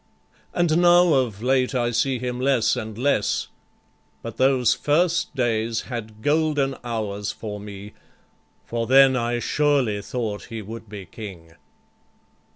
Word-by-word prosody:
And 170 -2 +2
now 175 -1 +6
of 120 -6 0
late 130 0 +1
I 120 -1 +1
see 130 +2 +1
him 125 0 -4
less 130 -4 +2
and 110 -1 -6
less, 125 -4 0 0.7
But 115 -1 -7
those 130 -2 +3
first 170 +3 +1
days 115 -2 0
had 110 -3 -7
golden 145 -3 +1
hours 105 -4 -3
for 105 -2 -7
me, 100 0 -9 0.7
For 115 -1 -3
then 135 0 +6
I 120 -1 0
surely 135 -5 +1
thought 110 -2 -4
he 115 -2 -7
would 110 +1 -9
be 100 -2 -8
king. 85 -3 -10
120 Hz, 135 wpm, -23 LUFS, 110-135 Hz, 0.7 s, now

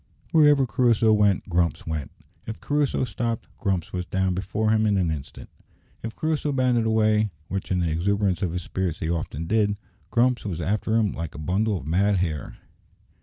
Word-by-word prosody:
Wherever 150 -4 +5
Crusoe 115 -2 +3
went 105 -3 +2
Grumps 85 -2 0
went. 80 -4 -3 0.4
If 110 - -5
Crusoe 145 -2 0
stopped, 115 -1 -2
Grumps 95 -4 -1
was 90 -1 -3
down 95 -1 0
before 100 +4 -1
him 110 0 +3
in 100 -2 +2
an 90 -4 +1
instant. 70 -4 -7 0.5
If 115 0 -6
Crusoe 155 -2 -1
bounded 125 -4 +2
away, 110 -1 +3 0.2
which 95 +1 -4
in 90 -1 +1
the 85 -2 0
exuberance 95 +2 0
of 90 - 0
his 90 0 -3
spirits 90 -2 -2
he 80 - -2
often 80 -1 -3
did, 105 +2 +1 0.3
Grumps 120 +1 +2
was 90 -6 -4
after 105 +6 0
him 110 -3 +2
like 85 -1 -6
a - - -7
bundle 95 +7 0
of 80 - -8
mad 95 +6 +2
hair. 80 -7 -3
100 Hz, 180 wpm, -25 LUFS, 85-110 Hz, 0.5 s, Wherever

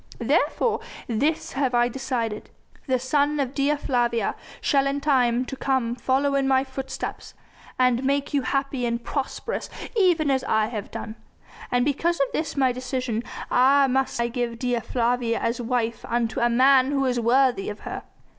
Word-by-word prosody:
Therefore 445 -2 +1 0.3
this 285 +8 -1
have 260 -2 0
I 240 0 +4
decided. 240 -4 -3 0.4
The 260 -1 +2
son 285 +3 +1
of 270 -2 -1
Dea 285 +1 +2
Flavia 240 -5 0 0.3
shall 275 -1 +2
in 275 +1 -1
time 255 -4 +2
to 270 - -6
come 260 -3 0
follow 265 +3 +1
in 275 -1 +1
my 265 0 +3
footsteps, 265 0 -6 0.4
and 250 0 +2
make 280 +2 0
you 285 - +2
happy 270 -1 -1
and 235 0 -2
prosperous 295 - -3 0.3
even 345 -8 +3
as 265 -1 +1
I 220 0 +1
have 215 -4 -5
done; 220 +1 -7 0.5
and 245 0 +2
because 330 +4 0
of 275 - +1
this 310 -2 -2
my 260 -2 +3
decision 250 -2 -3 0.3
must 265 0 +3
I 235 - +2
give 240 -1 -3
Dea 245 0 0
Flavia 235 0 0
as 235 +1 -1
wife 235 -1 -1
unto 230 -1 -1
a 240 - +3
man 260 +2 +5
who 275 -1 +1
is 250 -2 +1
worthy 245 -2 +2
of 210 - -7
her. - - -5
255 Hz, 165 wpm, -24 LUFS, 240-275 Hz, 0.5 s, man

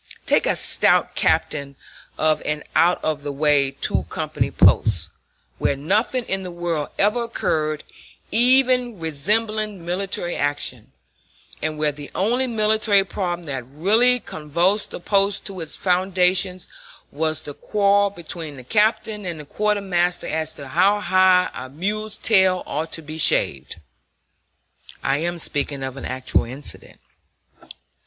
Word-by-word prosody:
Take - - +2
a - - +2
stout - - +2
captain 140 -2 0 0.4
of 155 0 +2
an 150 0 -3
out 175 +2 +3
of 155 -2 -1
the 145 0 -4
way 140 -1 +2
two - - -1
company - - -2
post, 85 -6 +3 0.5
where - - +1
nothing 210 - 0
in 195 0 -2
the 185 - -6
world 170 -4 -3
ever 225 +4 +2
occurred 155 -9 -1 0.5
even 250 -2 +3
resembling 210 +5 -1
military 180 -1 -2
action, 145 0 -3 0.7
and 155 0 -2
where 150 -1 +1
the 145 0 -10
only 245 +7 +1
military 215 -3 +2
problem 175 -2 -3
that 135 -4 -4
really 210 - +3
convulsed 170 +3 -1
the - - -7
post 200 +2 +1
to 190 -3 -7
its 160 - -4
foundations 185 0 +1 0.4
was 155 +1 -2
the 145 - -7
quarrel 200 +3 +2
between 165 -5 -8
the 130 - -10
captain 215 - +1
and 175 -4 -5
the 150 - -9
quartermaster 190 -2 0
as 160 0 -2
to 140 -2 -9
how 190 +8 +3
high 185 -2 +3
a 130 +1 -7
mule's 210 +8 -3
tail 190 -4 +3
ought 160 +2 -3
to 165 - -4
be 155 +2 -7
shaved 70 - +2 1.3
(I 135 +1 +1
am 175 +3 -2
speaking 145 -3 0
of 130 0 -5
an 135 - -7
actual 130 0 -1
incident). 130 +5 -9
175 Hz, 140 wpm, -22 LUFS, 150-205 Hz, 1.3 s, out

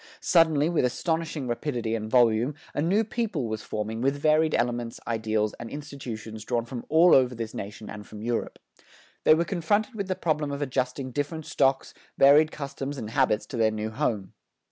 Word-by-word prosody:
Suddenly, 160 -3 +4
with 170 -4 +1
astonishing 160 +2 -1
rapidity 120 -2 -2
and 110 -1 -3
volume, 120 +3 +3 0.2
a - - -1
new 190 +8 +2
people 210 - -2
was 110 0 -4
forming 110 +1 -4
with 135 +2 +1
varied 155 +1 +3
elements, 120 0 -1
ideals 110 -2 0
and 120 - -7
institutions 120 -7 -7
drawn 120 0 -1
from 120 0 -7
all 165 +3 +6
over 125 -2 +4
this 115 -1 -5
nation 105 +2 -7
and 105 -1 -8
from 105 0 -9
Europe. 120 0 -2 0.7
They 155 - +7
were 170 +2 +1
confronted 205 +8 0
with 200 -3 -4
the 185 - -1
problem 155 -4 -1
of 140 - -4
adjusting 130 0 -2
different 145 +4 -3
stocks, 135 -1 +1 0.2
varied 150 +3 +6
customs 140 -1 -5
and 110 -4 -6
habits, 115 -4 +2
to 125 - -7
their 110 -1 +4
new 110 0 -3
home. 105 -4 -2
130 Hz, 180 wpm, -26 LUFS, 115-155 Hz, 0.7 s, They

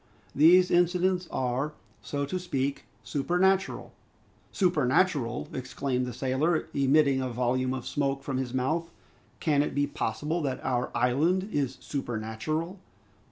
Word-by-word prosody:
These 180 +5 +6
incidents 180 +1 +2
are, 130 +3 -1 0.3
so 140 -1 -3
to 185 +6 -3
speak, 140 -6 -2 0.2
supernatural 180 - 0 0.3
" - - -34
"Supernatural!" 150 - +1
exclaimed 125 0 -2
the - - -4
sailor, 140 +7 0
emitting 140 0 +3
a 130 - -2
volume 125 +2 0
of 130 - -6
smoke 135 -1 -1
from 135 -2 -2
his 130 -2 -2
mouth. 155 +7 -1 0.5
"Can 145 -3 +2
it 150 - -2
be 145 0 +2
possible 150 +5 -2
that 135 -4 -2
our 125 -1 0
island 160 - +2
is 135 -3 -1
supernatural?" 140 - -3
140 Hz, 130 wpm, -28 LUFS, 130-170 Hz, 0.5 s, These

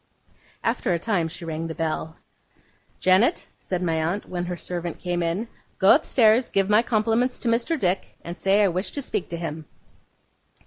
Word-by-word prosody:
After 230 -4 0
a - - +1
time 175 -2 0
she 170 +1 -8
rang 165 0 -4
the 160 - -6
bell. 160 0 -3 0.8
'Janet,' 190 - +3
said 180 -1 -3
my 160 -2 0
aunt, 180 +6 -2
when 175 -1 -3
her 175 0 -4
servant 175 -1 -5
came 175 -1 -2
in. 170 +7 -1 0.3
'Go 190 - +7
upstairs, 240 -5 +3
give 195 -1 +1
my 210 +2 +6
compliments 230 +2 +1
to - - -5
Mr. 240 +8 +1
Dick, 185 -3 -1
and 170 +2 -7
say 195 +2 +3
I - - +5
wish 180 +3 -1
to 285 - -2
speak 195 - -3
to 170 - -4
him. 160 -2 -5
185 Hz, 180 wpm, -24 LUFS, 170-220 Hz, 0.8 s, Go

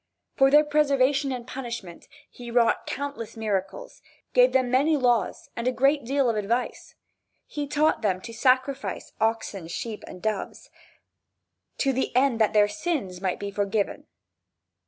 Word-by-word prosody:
For 270 0 +5
their 295 +2 +6
preservation 280 -2 +2
and 245 -2 -5
punishment 235 -10 -7 0.2
he 240 -1 -11
wrought 235 -1 +2
countless 280 -6 -5
miracles, 210 - -3 0.3
gave - - +6
them 255 -2 +1
many 290 +5 +3
laws 240 -7 0
and 235 +1 -3
a - - +3
great 275 +3 +2
deal 275 +1 +1
of 230 - +1
advice. 230 +4 -2 0.5
He 290 -1 -5
taught 300 +2 +2
them 190 -4 0
to 230 - -9
sacrifice 260 +3 0
oxen, 220 -5 -1
sheep, 215 +5 -5
and 180 - -10
doves, 215 0 -4 1.1
to 270 -1 +1
the 260 -1 -2
end 255 -3 +3
that 215 - +4
their 210 -1 +5
sins 210 - -3
might 185 -2 -1
be 200 0 -4
forgiven. 200 0 -2
245 Hz, 150 wpm, -26 LUFS, 215-275 Hz, 1.1 s, their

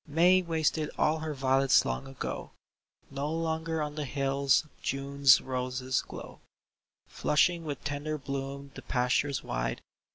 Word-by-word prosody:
" - - -36 0.2
May 185 +1 +6
wasted 160 -2 0
all 155 +1 +2
her 155 -1 -4
violets 135 0 +3
long 135 - -3
ago; 135 -1 -6 0.6
No 140 +2 -3
longer 160 -1 -1
on 150 0 -4
the 150 -1 -3
hills 135 +2 +1 0.2
June's 140 -1 +4
roses 130 0 -2
glow, - - -10 0.7
Flushing 165 +3 +1
with 145 -3 -5
tender 150 +1 -3
bloom 140 0 -5
the - - -9
pastures 125 +2 0
wide. - - -3
140 Hz, 135 wpm, -29 LUFS, 135-155 Hz, 0.7 s, May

